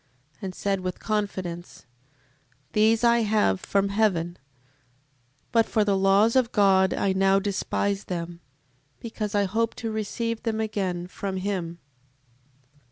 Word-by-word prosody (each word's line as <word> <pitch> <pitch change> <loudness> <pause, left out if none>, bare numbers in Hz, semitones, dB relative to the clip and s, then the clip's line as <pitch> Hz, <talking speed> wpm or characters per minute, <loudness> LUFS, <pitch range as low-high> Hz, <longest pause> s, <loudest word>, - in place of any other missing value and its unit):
And 190 -2 -5
said 195 -1 -1
with 185 0 -4
confidence: 190 -5 -4 0.9
These 220 +2 +3
I 235 0 +5
have 210 - +2
from 200 0 0
heaven, 185 -5 0 1.1
but 230 -1 +3
for 215 - +2
the 205 -1 +1
laws 195 +4 +4
of 250 -2 +3
God 195 -2 +4
I 195 - 0
now 195 0 +3
despise 200 0 -1
them, 170 -2 -5 0.6
because 215 -2 -4
I 205 - +3
hope 225 +4 -1
to 225 -1 -4
receive 225 +1 -3
them 225 -1 -2
again 195 -5 -2
from 190 +1 -5
him. 185 -3 -3
200 Hz, 130 wpm, -25 LUFS, 190-220 Hz, 1.1 s, I